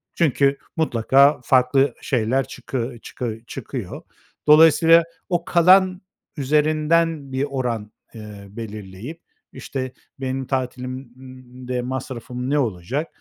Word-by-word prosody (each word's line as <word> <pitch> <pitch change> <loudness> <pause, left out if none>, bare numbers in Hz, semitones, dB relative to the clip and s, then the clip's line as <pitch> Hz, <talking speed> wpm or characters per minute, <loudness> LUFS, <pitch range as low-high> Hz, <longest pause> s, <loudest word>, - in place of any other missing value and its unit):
çünkü 140 -3 +2 0.2
mutlaka 140 0 +4
farklı 135 +2 +3
şeyler 130 +1 0
çıkı 120 -1 -5
çıkı 115 -3 -5
çıkıyor. - - -6 0.5
Dolayısıyla, 165 +2 +7 0.3
o 175 -1 0
kalan 185 +2 +4 0.4
üzerinden 155 +1 +1
bir 130 +1 -1
oran, 120 -6 -3 0.2
eee, 105 -3 -10
belirleyip, 110 - -8 0.3
işte, 130 -2 -5 0.3
benim 130 0 -3
tatilimde 130 -1 -5
masrafım 125 0 -5
ne 145 0 +2
olacak? 120 - -2
130 Hz, 95 wpm, -22 LUFS, 120-150 Hz, 0.5 s, Dolayısıyla